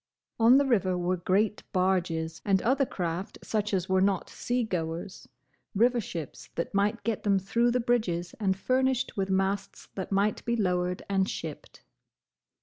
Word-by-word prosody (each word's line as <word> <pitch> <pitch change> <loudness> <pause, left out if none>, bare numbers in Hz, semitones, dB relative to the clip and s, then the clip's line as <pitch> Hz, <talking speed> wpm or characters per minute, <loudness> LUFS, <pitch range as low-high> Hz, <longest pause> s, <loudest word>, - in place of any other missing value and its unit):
On 235 +3 +7
the 280 - +3
river 195 -8 +2
were 180 +1 0
great 195 +4 +1
barges, 175 -4 0
and 195 -2 +3
other 265 +3 +2
craft 175 +1 -4
such 210 -1 -1
as 185 -2 0
were 190 0 +2
not 195 -1 +1
sea 245 0 -1
goers, 175 -2 -4 0.5
river 240 +3 +3
ships 165 -7 -7
that 170 - -3
might 205 +3 +1
get 225 -2 -1
them 200 -2 +2
through 230 +6 +1
the 245 +1 +1
bridges 215 -8 0
and 190 -3 +1
furnished 260 +3 +1
with 195 -1 -1
masts 195 +1 -1
that 190 0 -5
might 200 +2 +1
be 235 - 0
lowered 180 -4 0
and 195 -1 +1
shipped. 155 - -7
195 Hz, 160 wpm, -28 LUFS, 180-225 Hz, 0.5 s, On